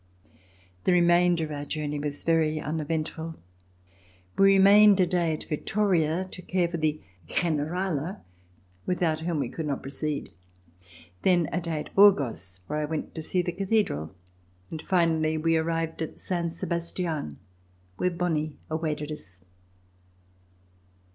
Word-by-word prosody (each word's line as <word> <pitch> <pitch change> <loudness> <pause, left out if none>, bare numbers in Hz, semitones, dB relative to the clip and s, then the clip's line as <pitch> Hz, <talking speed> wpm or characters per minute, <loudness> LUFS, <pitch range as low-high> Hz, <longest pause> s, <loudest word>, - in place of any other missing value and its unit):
The 185 - +4
remainder 175 -1 +4
of 155 - -8
our 145 -1 -4
journey 150 0 -3
was 145 0 -2
very 160 -2 +2
uneventful. 160 +1 -3 1.0
We 195 - +5
remained 200 +1 +7
a 185 - +5
day 175 -2 +1
at 155 - -5
Vittoria 175 0 0
to 185 0 -9
care 180 -1 0
for 170 0 -4
the 155 -1 0 0.3
''Generala," 170 - -1 0.7
without 170 -3 +1
whom 165 0 -2
we 130 - -1
could 155 +5 -5
not 140 -2 -3
proceed. 145 +2 -3 0.9
Then 175 -4 +3
a 180 - -1
day 165 -3 -2
at - - -11
Burgos, 120 - +4
where 150 +1 -2
I 150 - 0
went 155 +1 -4
to 160 - -5
see 180 +3 0
the 175 - -2
Cathedral, 185 - -1 0.6
and 160 - -5
finally 160 -3 +2
we 165 +1 +2
arrived 165 0 -1
at 160 - -5
Saint 170 -2 -2
Sebastlen, 170 - -3 0.6
where 180 - +1
Bonie 160 -4 -1 0.2
awaited 155 -2 -2
us. 95 - -9
165 Hz, 135 wpm, -27 LUFS, 150-180 Hz, 1.0 s, remained